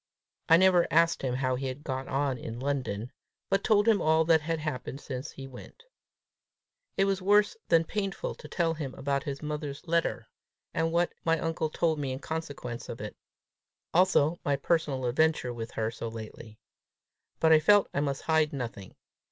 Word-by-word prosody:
I 165 - +8
never 185 -1 +5
asked 165 +2 +3
him 125 -2 -1
how 130 0 0
he 135 +1 -2
had 130 +3 -6
got 130 -1 -4
on 135 0 0
in 115 +1 -6
London, 130 -4 -2 0.4
but 195 0 +2
told 210 -1 +3
him 215 -5 +4
all 160 +1 +3
that 160 -1 +4
had 165 +2 -1
happened 150 -3 -4
since 130 -1 -6
he 135 - -9
went. 135 - -12 1.1
It 195 - +4
was 195 -1 0
worse 205 - +4
than 165 -1 +4
painful 195 +2 -3
to - - -12
tell 165 -2 0
him 145 -5 -5
about 140 0 -1
his 140 +1 -5
mother's 150 0 -5
letter, 170 0 0 0.5
and 165 0 0
what 170 +1 +1
my 165 0 +2
uncle 160 0 -1
told 160 0 0
me 140 -2 -2
in - - -4
consequence 145 -6 -5
of - - -6
it, - - -6 0.8
also 175 -2 +3
my 145 - +1
personal 140 -3 0
adventure 130 0 +1
with 115 -1 -6
her 110 0 -1
so 115 - -6
lately; 110 -1 -9 0.8
but 160 - +4
I 160 - +8
felt 205 +6 +5
I - - 0
must 140 -1 -2
hide 160 -2 +2
nothing. 115 -8 -6
150 Hz, 180 wpm, -29 LUFS, 130-165 Hz, 1.1 s, I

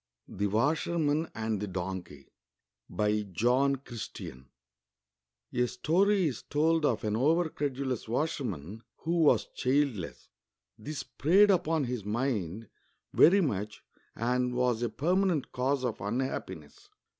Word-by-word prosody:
THE 100 +1 -2
WASHEIC\L\X 150 - +1
.\XD 110 -2 -2
THE 105 - -3
DONKEY 90 -6 -6 0.6
BY 105 +3 +1
JOHN 125 +8 +3
CHRI5TL\N 115 - -8 1.1
A 125 0 +2
STORY 190 - +2
15 120 - -11
told 160 +1 +2
of 115 -5 -1
an 105 -1 0
over 160 +8 +3
credulous 135 -5 -3
washerman 110 - -3 0.2
who 170 +2 0
was 155 - +4
childless. 120 - -1 0.5
This 150 +7 -5
preyed 195 +7 +4
upon 165 -4 +1
his 125 -4 -3
mind 110 -3 -2 0.5
very 195 +5 +6
much 105 - -3 0.3
and 125 +1 0
was 125 -2 +1
a 120 - 0
pennanent 175 - 0
cause 130 +1 0
of 120 - -3
unhappiness. 100 - -4
125 Hz, 120 wpm, -30 LUFS, 105-150 Hz, 1.1 s, very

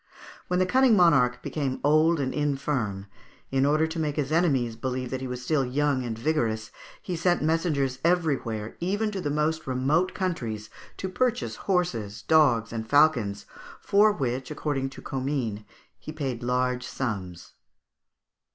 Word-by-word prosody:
When 180 - 0
the 185 - +3
cunning 255 +3 +4
monarch 130 -9 +4
became 135 -4 -2
old 155 +3 +4
and 130 -2 -1
infirm, 135 -9 -1 0.5
in 135 +1 +2
order 155 +2 +3
to 160 +1 -4
make 150 -2 -1
his 150 -1 -2
enemies 135 -9 +2
believe 125 +1 -3
that 130 -1 -3
he 130 - -4
was 125 0 -5
still 140 +1 +1
young 135 +1 0
and 115 -2 -4
vigorous, 115 -5 -1 0.3
he 180 - -3
sent 175 -1 +1
messengers 150 -5 0
everywhere, 140 -11 0
even 205 +5 -1
to 195 -2 -4
the 145 - -2
most 150 +1 -1
remote 140 +8 +1
countries, 115 - -3 0.3
to 190 - -3
purchase 245 +6 -1
horses, 115 - -1
dogs, 120 -8 +3
and 110 -1 -5
falcons, 125 -10 +3 0.3
for 210 +2 +4
which, 130 -7 -3
according 145 -3 -2
to - - -12
Comines, 130 -5 -2 0.4
he - - -8
paid 135 -6 -4
large 125 0 0
sums 95 -9 -4
(Fig. - - -28
140 Hz, 155 wpm, -26 LUFS, 125-160 Hz, 0.5 s, cunning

